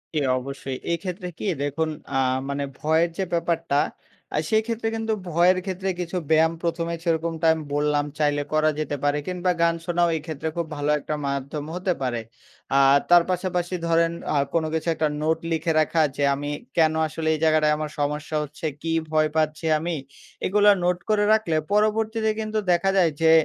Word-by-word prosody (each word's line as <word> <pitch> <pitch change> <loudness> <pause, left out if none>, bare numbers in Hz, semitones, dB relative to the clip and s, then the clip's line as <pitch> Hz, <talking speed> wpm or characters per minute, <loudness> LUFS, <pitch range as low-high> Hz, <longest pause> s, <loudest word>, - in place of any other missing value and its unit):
জি, 155 - +3 0.2
অবশ্যই। 135 0 -6 0.2
এক্ষেত্রে 180 +2 -4
কি? - - -4 0.2
দেখুন 145 +3 -1 0.3
আ - - +3 0.3
মানে 140 0 -2 0.2
ভয়ের 160 +3 +2
যে 190 - 0
ব্যাপারটা 165 -3 0 0.6
আ - - +1
সেই 220 0 +4
ক্ষেত্রে 225 -1 -2
কিন্তু 225 0 -1 0.2
ভয়ের 175 +3 +4
ক্ষেত্রে 190 0 -3
কিছু 175 +1 -3
ব্যায়াম 160 +1 +4
১ম 170 -1 -1
এ - - -1
সেরকমটা 165 0 0
আমি 160 -1 -5
বললাম 145 0 +1
চাইলে 145 -1 +2
করা 155 0 +3
যেতে 145 -1 -2
পারে। 145 0 +2
কিংবা 180 0 0
গান 170 0 +3
শোনাও 175 -1 +2
এই 155 - -3
ক্ষেত্রে 160 0 -4
খুব 170 - -1
ভালো 145 0 -1
একটা 150 - -3
মাধ্যম 140 +2 -3
হতে 180 0 0
পারে। 120 -3 -1 0.6
আর 135 +1 +6
তার 175 -1 +7
পাশাপাশি 180 0 -1
ধরেন 165 0 +3 0.2
আ - - +1 0.2
কোনো 160 -1 +1
কিছু 160 +1 -2
একটা 155 0 +1
নোট 160 +1 +2
লিখে 165 +1 0
রাখা 160 +1 +2
যে, 145 - -1
"আমি 145 +1 -4 0.3
কেন 160 -1 +4
আসলে 160 +1 -4
এই 155 - -2
জায়গাটায় 155 -1 +4
আমার 155 -1 -4
সমস্যা 150 +2 -2
হচ্ছে? 150 +3 -8 0.2
কী 165 0 -1 0.2
ভয় 155 0 +3
পাচ্ছি 155 +1 0
আমি?" 170 +1 -2 0.5
এগুলা 205 +2 +5
নোট 180 0 +2
করে 210 -1 +3
রাখলে 215 -8 +1 0.2
পরবর্তীতে 220 +1 +2
কিন্তু 215 0 -2
দেখা 175 +2 +2
যায় 170 -4 +4
যে 160 0 +6
165 Hz, 180 wpm, -24 LUFS, 150-180 Hz, 0.6 s, তার